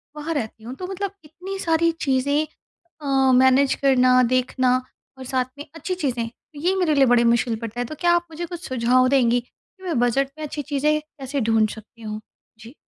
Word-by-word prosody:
वहाँ 310 Hz, +2 st, -3 dB
रहती 220 Hz, -4 st, -4 dB
हूँ 245 Hz, +3 st, -7 dB
तो 365 Hz, +5 st, -6 dB
मतलब 390 Hz, 0 st, -4 dB
इतनी 365 Hz, +6 st, -7 dB
सारी 330 Hz, 0 st, +2 dB
चीज़ें 285 Hz, +2 st, +1 dB, 0.6 s
अ, 270 Hz, -2 st, +3 dB
मैनेज 260 Hz, +2 st, +5 dB
करना, 255 Hz, -2 st, +4 dB
देखना 255 Hz, +1 st, +2 dB, 0.4 s
और 260 Hz, -, -8 dB
साथ 255 Hz, -1 st, 0 dB
में 290 Hz, -, -8 dB
अच्छी 365 Hz, +3 st, -3 dB
चीज़ें 250 Hz, -9 st, -2 dB
तो 290 Hz, +5 st, -16 dB
ये 365 Hz, +4 st, +1 dB
मेरे 340 Hz, -5 st, +2 dB
लिए 270 Hz, -1 st, +5 dB
बड़ी 240 Hz, -1 st, +4 dB
मुश्किल 235 Hz, -1 st, +2 dB
पड़ता 230 Hz, +1 st, -6 dB
है। 245 Hz, -, -1 dB
तो 310 Hz, -, -7 dB
क्या 345 Hz, -1 st, +4 dB
आप 345 Hz, 0 st, 0 dB
मुझे 340 Hz, +2 st, -5 dB
कुछ 350 Hz, +1 st, -8 dB
सुझाव 255 Hz, +1 st, +3 dB
देंगी 245 Hz, -3 st, +3 dB
कि 375 Hz, -, -30 dB
मैं 330 Hz, -9 st, -1 dB
बजट 265 Hz, +3 st, +1 dB
में 310 Hz, -, -5 dB
अच्छी 295 Hz, 0 st, -4 dB
चीज़ें 300 Hz, +2 st, +1 dB
कैसे 280 Hz, -3 st, -6 dB
ढूँढ़ 220 Hz, -1 st, +2 dB
सकती 225 Hz, +1 st, -12 dB
हूँ? 215 Hz, 0 st, -5 dB, 0.4 s
जी। 230 Hz, +5 st, -13 dB
265 Hz, 200 wpm, -23 LUFS, 245-310 Hz, 0.6 s, मैनेज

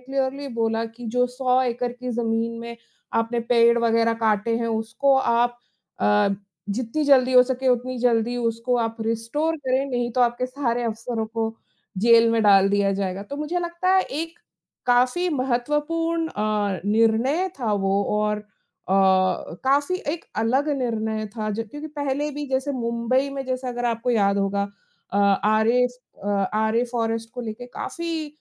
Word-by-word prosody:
Clearly 270 Hz, +2 st, -2 dB
बोला 225 Hz, 0 st, 0 dB
कि 230 Hz, +1 st, -10 dB
जो 250 Hz, 0 st, +4 dB
100 250 Hz, 0 st, +1 dB
एकड़ 245 Hz, -1 st, -2 dB
की 250 Hz, +1 st, -6 dB
जमीन 230 Hz, 0 st, -1 dB
में 235 Hz, 0 st, -7 dB, 0.4 s
आपने 230 Hz, +1 st, 0 dB
पेड़ 235 Hz, 0 st, +5 dB
वगैरह 230 Hz, 0 st, +2 dB
काटे 220 Hz, +1 st, +2 dB
हैं 235 Hz, -, -1 dB
उसको 225 Hz, +5 st, +1 dB
आप 240 Hz, -1 st, +1 dB, 0.4 s
अ, 210 Hz, -1 st, +3 dB, 0.4 s
जित्ती 240 Hz, +7 st, -2 dB
जल्दी 260 Hz, -3 st, +5 dB
हो 250 Hz, 0 st, +8 dB
सके 260 Hz, 0 st, -1 dB
उतनी 250 Hz, +1 st, 0 dB
जल्दी 240 Hz, 0 st, +1 dB
उसको 230 Hz, +1 st, 0 dB
आप 225 Hz, -1 st, -1 dB
रिस्टोर 230 Hz, +9 st, -1 dB
करें, 265 Hz, -2 st, 0 dB
नहीं 245 Hz, -1 st, -1 dB
तो 255 Hz, -, 0 dB
आपके 240 Hz, +1 st, +1 dB
सारे 255 Hz, -2 st, -2 dB
अफसरों 225 Hz, 0 st, -3 dB
को 225 Hz, 0 st, -3 dB, 0.4 s
जेल 230 Hz, +2 st, +6 dB
में 230 Hz, -1 st, +2 dB
डाल 195 Hz, -2 st, +6 dB
दिया 200 Hz, 0 st, +2 dB
जाएगा। 195 Hz, 0 st, -3 dB
तो 280 Hz, +8 st, -7 dB
मुझे 300 Hz, +4 st, -2 dB
लगता 345 Hz, +1 st, -2 dB
है 380 Hz, -, +5 dB
एक 330 Hz, +2 st, -5 dB, 0.5 s
काफ़ी 250 Hz, +9 st, +3 dB
महत्वपूर्ण 295 Hz, +6 st, 0 dB
अ, 210 Hz, -, -1 dB
निर्णय 230 Hz, -, +2 dB
था 225 Hz, -4 st, 0 dB
वो 195 Hz, 0 st, +1 dB, 0.2 s
और 210 Hz, 0 st, 0 dB
अ, 210 Hz, -, -12 dB, 0.5 s
काफ़ी 190 Hz, -, +2 dB, 0.2 s
एक 335 Hz, -, -6 dB, 0.2 s
अलग 265 Hz, +6 st, +1 dB
निर्णय 220 Hz, -3 st, -2 dB
था 215 Hz, -1 st, -2 dB
जब 220 Hz, +1 st, -4 dB
क्योंकि 295 Hz, +4 st, -7 dB
पहले 290 Hz, 0 st, -2 dB
भी 290 Hz, +1 st, -5 dB
जैसे 265 Hz, +2 st, -1 dB
मुंबई 240 Hz, +2 st, 0 dB
में 275 Hz, -1 st, -5 dB
जैसे 255 Hz, 0 st, -3 dB
अगर 245 Hz, 0 st, -4 dB
आपको 230 Hz, +1 st, -1 dB
याद 200 Hz, -4 st, +2 dB
होगा 200 Hz, 0 st, 0 dB, 0.5 s
अ, -, -, -1 dB
आरे 215 Hz, +4 st, +3 dB, 0.7 s
आरे 220 Hz, +2 st, +2 dB
फ़ॉरेस्ट 225 Hz, -1 st, -2 dB
को 250 Hz, -, -4 dB
लेकर 230 Hz, +2 st, -6 dB
काफ़ी 330 Hz, -2 st, -4 dB
235 Hz, 160 wpm, -23 LUFS, 225-265 Hz, 0.7 s, हो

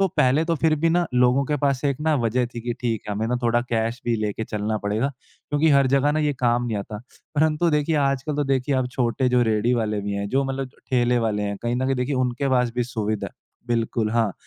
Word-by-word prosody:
तो 195 Hz, -, +4 dB
पहले 135 Hz, +5 st, +3 dB
तो 165 Hz, 0 st, 0 dB
फ़िर 155 Hz, +1 st, +2 dB
भी -, -, +5 dB
ना 175 Hz, 0 st, +2 dB
लोगों 125 Hz, +2 st, +4 dB
के 150 Hz, +2 st, -1 dB
पास 140 Hz, -2 st, +1 dB
एक 140 Hz, -2 st, +1 dB
ना 155 Hz, 0 st, +2 dB
वज़ह 120 Hz, 0 st, +1 dB
थी 120 Hz, -, -4 dB
कि 120 Hz, +1 st, -3 dB
ठीक 115 Hz, -3 st, -1 dB
है 105 Hz, -, -2 dB
हमें 110 Hz, +2 st, -1 dB
ना 125 Hz, -, +1 dB
थोड़ा 120 Hz, 0 st, +2 dB
कैश 115 Hz, +1 st, -1 dB
भी 120 Hz, -, +1 dB
लेके 105 Hz, 0 st, -2 dB
चलना 105 Hz, 0 st, -2 dB
पड़ेगा 110 Hz, +7 st, 0 dB
क्योंकि 145 Hz, +3 st, -3 dB
हर 140 Hz, -1 st, +5 dB
जगह 140 Hz, +2 st, +3 dB
ना 155 Hz, -, 0 dB
ये 150 Hz, -1 st, +1 dB
काम 120 Hz, 0 st, +2 dB
नहीं 110 Hz, -3 st, -2 dB
आता। 105 Hz, +1 st, -6 dB, 0.4 s
परंतु 155 Hz, +2 st, +2 dB
देखिए 150 Hz, +1 st, +1 dB
आजकल 140 Hz, +2 st, -1 dB
तो 145 Hz, -, +1 dB
देखिए 135 Hz, 0 st, 0 dB
अब 130 Hz, -1 st, +1 dB
छोटे 125 Hz, +1 st, 0 dB
जो 125 Hz, 0 st, +3 dB
रेहड़ी 110 Hz, +2 st, +1 dB
वाले 110 Hz, -3 st, -1 dB
भी 100 Hz, 0 st, -4 dB
हैं 100 Hz, 0 st, -3 dB
जो 135 Hz, +3 st, +1 dB
मतलब 135 Hz, -1 st, -3 dB, 0.2 s
ठेले 125 Hz, -1 st, +2 dB
वाले 105 Hz, -1 st, -1 dB
हैं 100 Hz, 0 st, -2 dB
कहीं 120 Hz, +1 st, -1 dB
न 130 Hz, -, -1 dB
कहीं 135 Hz, -, +1 dB
देखिए 125 Hz, +3 st, -1 dB
उनके 130 Hz, +2 st, 0 dB
पास 125 Hz, -2 st, +2 dB
भी 120 Hz, -, +1 dB
सुविधा 110 Hz, -3 st, -3 dB, 0.4 s
बिल्कुल, 115 Hz, -2 st, 0 dB
हाँ। 115 Hz, -4 st, +1 dB
125 Hz, 245 wpm, -23 LUFS, 115-140 Hz, 0.4 s, भी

